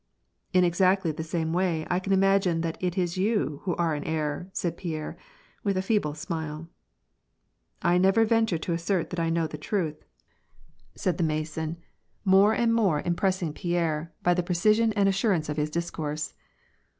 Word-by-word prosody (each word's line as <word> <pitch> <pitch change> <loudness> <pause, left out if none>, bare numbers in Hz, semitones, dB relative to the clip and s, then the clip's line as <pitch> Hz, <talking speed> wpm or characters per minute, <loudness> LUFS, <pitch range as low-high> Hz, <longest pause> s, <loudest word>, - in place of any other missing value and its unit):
" - - -50
In 180 0 +4
exactly 185 0 +3
the 155 +1 -5
same 160 0 -2
way, 175 -3 0
I 180 - +1
can 195 +1 -4
imagine 195 -3 +3
that 165 -1 -2
it 180 0 -1
is 180 0 0
you 185 - 0
who 180 - 0
are 170 -2 +1
in 145 - -4
error," 155 +2 -2
said 170 -3 -2
Pierre, 160 -4 -5 0.5
with 200 -2 0
a 185 - 0
feeble 190 -8 0
smile. 160 -1 -5 0.6
" - - -49 0.3
I 175 +1 +4
never 195 +5 +4
venture 225 -5 +2
to 170 +2 -3
assert 170 +1 -1
that 175 -2 -1
T 165 - 0
know 165 0 +1
the 150 -1 -6
truth," 155 -3 -2 0.9
said 185 0 -1
the - - +2
WAR 155 -1 +1
AND 155 - 0
PEACE. 155 0 -7
71 160 0 -3
Mason, 170 - -26 0.4
more 195 +3 +6
and 230 -1 +2
more 195 -10 +2
impressing 175 -2 0
Pierre 165 -2 -1
by 175 - +4
the 180 - +1
precision 215 +6 +2
and 200 -1 +3
assurance 195 -5 +1
of 150 - -3
his 150 0 0
discourse. 155 -2 -3
175 Hz, 190 wpm, -27 LUFS, 160-190 Hz, 0.9 s, more